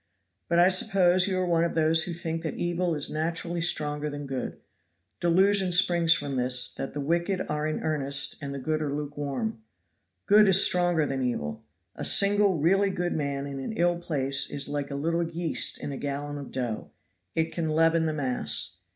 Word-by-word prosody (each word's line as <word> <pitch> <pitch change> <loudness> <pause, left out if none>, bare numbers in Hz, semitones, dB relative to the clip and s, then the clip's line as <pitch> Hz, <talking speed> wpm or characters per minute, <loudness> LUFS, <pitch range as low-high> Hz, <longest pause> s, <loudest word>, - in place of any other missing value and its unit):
But 170 - +2
I 175 +1 +6
suppose 185 -1 +3
you 190 -2 -1
are 185 - 0
one 170 -1 +2
of 170 - -2
those 160 0 +2
who 175 - -4
think 165 -1 -4
that 160 - -4
evil 175 -1 -1
is 145 - 0
naturally 170 +2 -3
stronger 150 -2 0
than 145 0 -6
good. 135 -2 -5 0.6
Delusion 190 +2 +3
springs 175 -2 +4
from 145 -4 +1
this, 125 0 +2
that 135 - -6
the - - -3
wicked 170 +6 -1
are 150 0 -2
in 155 - -3
earnest 140 -3 +1
and 140 -1 -5
the 140 - -5
good 155 +3 -2
are 150 -2 -2
lukewarm. 140 -6 -4 0.6
Good 210 0 +6
is 190 0 +6
stronger 175 -3 +2
than 135 -1 -3
evil. 95 -13 -3 0.3
A - - -6
single 200 -2 +3
really 195 +6 +2
good 175 -2 -2
man 140 -2 -3
in 140 -1 -6
an 135 - -5
ill 175 -4 +1
place 140 -5 -1
is 140 -1 -2
like 145 -1 -3
a 140 - -5
little 165 +4 -1
yeast 165 0 0
in - - -5
a 135 - -5
gallon 145 +1 -4
of 140 - -9
dough; 120 -4 -4 0.5
it 160 0 0
can 165 -2 -3
leaven 165 +1 +2
the 155 - -1
mass. 125 - -2
160 Hz, 195 wpm, -27 LUFS, 140-175 Hz, 0.6 s, I